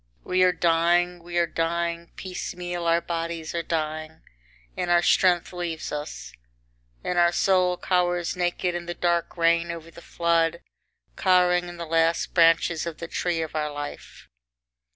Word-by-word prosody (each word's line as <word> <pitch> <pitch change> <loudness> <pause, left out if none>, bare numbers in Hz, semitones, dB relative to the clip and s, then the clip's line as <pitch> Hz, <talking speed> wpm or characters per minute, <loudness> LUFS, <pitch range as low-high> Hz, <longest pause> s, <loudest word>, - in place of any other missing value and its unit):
We 185 0 +1
are 185 0 +6
dying, 175 +1 +2
we 175 +1 -5
are 170 - +4
dying, 170 +1 -2
piecemeal 175 -2 -5
our 170 0 +3
bodies 165 -1 -4
are 170 - -1
dying 155 -1 -3 0.5
and 180 - -2
our 175 0 +4
strength 180 -1 +3
leaves 175 -3 -4
us, 105 - -6 0.7
and 180 -1 0
our 170 0 +5
soul 180 -1 +2
cowers 175 -1 0
naked 180 0 -1
in 175 0 -5
the 175 - -4
dark 170 0 0
rain 170 0 +2
over 165 -1 -7
the 170 - -13
flood, 170 0 0 0.5
cowering 180 -1 +3
in 175 - -9
the 170 - -5
last 165 +1 +1
branches 165 -1 +3
of 165 - -5
the 170 - -6
tree 170 -1 -1
of 160 - -7
our 150 -1 -1
life. 145 0 -8
170 Hz, 155 wpm, -25 LUFS, 165-175 Hz, 0.7 s, are